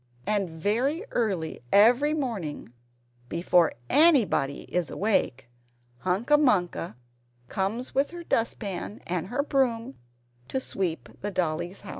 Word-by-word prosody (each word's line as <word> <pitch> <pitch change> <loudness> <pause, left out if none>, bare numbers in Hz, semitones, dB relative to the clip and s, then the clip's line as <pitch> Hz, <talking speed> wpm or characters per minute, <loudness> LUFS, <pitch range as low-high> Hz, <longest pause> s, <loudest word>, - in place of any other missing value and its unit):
And 205 -3 0
very 230 - 0
early 190 -9 -1
every 245 +9 +5
morning 200 - -4 0.6
before 170 -1 +3
anybody 265 - +4
is 180 -2 -2
awake 165 - 0 0.5
Hunca 220 - +2
Munca 180 - +1 0.5
comes 215 +6 -2
with 275 +2 +2
her 345 0 -8
dust 230 -8 0
pan 200 0 -5
and 175 -1 -2
her 250 +6 -1
broom 260 -3 0 0.5
to 265 - -1
sweep 185 -9 -3
the 205 - -2
Dollies' 175 0 -2
house! - - -11
205 Hz, 120 wpm, -27 LUFS, 175-260 Hz, 0.6 s, every